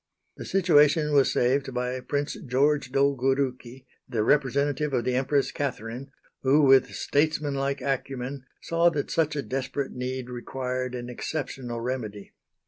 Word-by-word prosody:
The - - -7
situation 150 -4 +4
was 140 -2 +4
saved 130 +1 +1
by 125 +1 -2
Prince 145 +3 -2
George 135 +1 +2
Dolgourouki, 135 -2 0 0.2
the 115 -4 0
representative 140 +2 +1
of 120 - +1
the 125 - +1
Empress 135 +2 +1
Catherine, 125 -1 -4 0.3
who, 140 +3 +4
with 135 -1 +6
statesmanlike 140 -2 0
acumen, 135 0 -3 0.2
saw 170 +1 +3
that 150 -4 -3
such 155 -2 +1
a 140 - -2
desperate 135 +1 -3
need 125 0 -4
required 125 +1 -4
an 120 -1 -5
exceptional 125 -2 -4
remedy. 115 -5 -5
135 Hz, 135 wpm, -26 LUFS, 125-145 Hz, 0.3 s, with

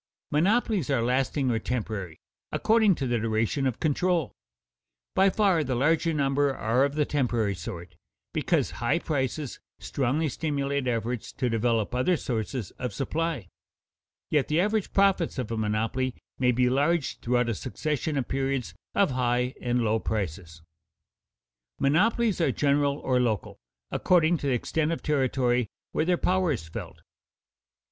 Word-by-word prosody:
Monopolies 195 - +2
are 135 -5 +2
lasting 130 +2 +1
or 115 - +1
temporary, 105 -8 -4 0.3
according 220 -4 +3
to 135 - -3
the 120 -2 0
duration 115 +5 0
of 125 - -3
control. 170 0 +1 0.8
By 195 +1 +5
far 190 -5 +2
the 130 -2 -1
larger 160 +6 +2
number 140 -2 +1
are 115 +5 +2
of 140 0 0
the 150 -1 +2
temporary 120 -8 0
sort, 85 0 -8 0.4
because - - +1
high - - +2
prices 140 -1 -2 0.2
strongly 140 +4 -1
stimulate 140 -1 -1
efforts 120 -1 -2
to 125 -2 -1
develop 115 -1 +1
other 130 +8 +2
sources 115 -3 -3
of 125 -5 -4
supply. 150 - -2 0.8
Yet 150 -4 +2
the 155 +2 +1
average 210 +2 +1
profits 195 -5 +2
of 125 -4 -3
a - - -1
monopoly 110 +4 -1 0.2
may 125 -1 +4
be 125 +1 +2
large 145 +4 +1
throughout 120 0 +1
a - - +1
succession 150 +5 -2
of 130 - -1
periods 135 -2 -1 0.2
of 200 -6 +3
high 125 0 0
and 120 -1 +1
low 110 0 +2
prices. 85 -6 -4 1.1
Monopolies 210 - +2
are 150 - +3
general 140 +1 +2
or 130 -3 +1
local, 115 -5 -1 0.3
according 175 -1 +3
to 145 - -4
the 135 - +2
extent 155 +6 0
of 165 - -3
territory 130 -5 +1 0.2
where 155 - 0
their 180 0 +2
power 185 -2 +1
is 90 - -3
felt. 80 - -8
135 Hz, 150 wpm, -27 LUFS, 120-155 Hz, 1.1 s, By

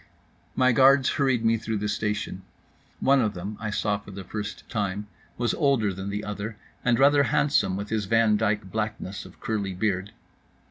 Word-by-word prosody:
My 130 0 +4
guards 135 +2 +5
hurried 130 -5 +1
me 115 0 +4
through 110 0 -3
the 105 +1 -2
station. 105 0 -2 0.6
One 135 0 +4
of 110 -4 0
them 95 +4 -5
(I 105 - -3
saw 105 -1 0
for 100 - -14
the 100 0 -7
first 105 +2 -6
time) 105 -2 -2 0.3
was 120 -1 0
older 135 - +2
than 95 +2 -5
the 105 +1 -3
other, 105 +1 -5 0.3
and 120 -1 +3
rather 140 +2 +5
handsome 135 -7 +2
with 100 +1 -5
his 110 -2 -1
Van 115 0 +3
Dyck 105 0 +1
blackness 110 -3 -4
of - - -18
curly 100 -4 -2
beard. 95 0 -1
105 Hz, 180 wpm, -26 LUFS, 100-120 Hz, 0.6 s, guards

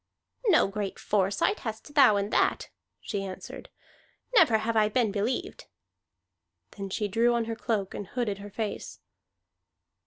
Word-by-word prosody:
"No 345 - +5
great 200 0 -4
foresight 200 - +1
hast 220 +5 -7
thou 275 -8 +6
in 200 +2 -2
that," - - +1 0.3
she 200 -3 -3
answered. 190 -1 -8 0.6
"Never 320 - +6
have 225 +1 -2
I 215 -1 +4
been 225 -1 +1
believed." 215 +5 -2 1.1
Then 195 -1 -6
she 210 +2 -1
drew 230 +4 +2
on 235 -1 0
her 225 0 -3
cloak 220 -4 -2
and 205 - -6
hooded 215 -4 -2
her 205 +1 -8
face. 215 +1 -5
215 Hz, 145 wpm, -28 LUFS, 200-235 Hz, 1.1 s, thou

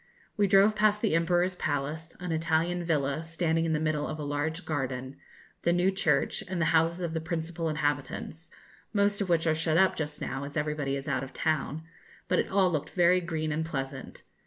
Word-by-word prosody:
We 205 -1 +3
drove 200 +2 +5
past 210 0 +2
the 215 - +2
Emperor's 175 +2 +2
palace 155 +2 -3
an 180 -1 -4
Italian 165 +2 +1
villa, 150 -3 0
standing 165 0 0
in 160 - 0
the 155 - +1
middle 155 -1 0
of 155 - -4
a 150 - -5
large 145 +4 -2
garden 130 -3 -3 0.5
the 170 - +2
new 175 +2 +3
church, 150 -7 +1
and 185 -1 -3
the 165 - +2
houses 165 +2 +3
of 170 -2 -2
the 160 - -2
principal 165 0 -3
inhabitants, 150 +2 -3 0.4
most 200 0 +2
of 195 - -1
which 170 -1 +2
are 160 - +3
shut 160 0 +1
up 190 +1 +4
just 150 -1 -4
now, 135 +1 -4
as 145 +2 -6
everybody 150 -2 -1
is 135 0 -5
out 130 - 0
of 135 - -8
town, 155 -1 -1 0.4
but - - +2
it - - 0
all 190 -2 +3
looked 150 -3 -2
very 180 0 +4
green 160 -3 -2
and 155 +2 -1
pleasant. 135 -4 -5
160 Hz, 205 wpm, -29 LUFS, 150-175 Hz, 0.5 s, drove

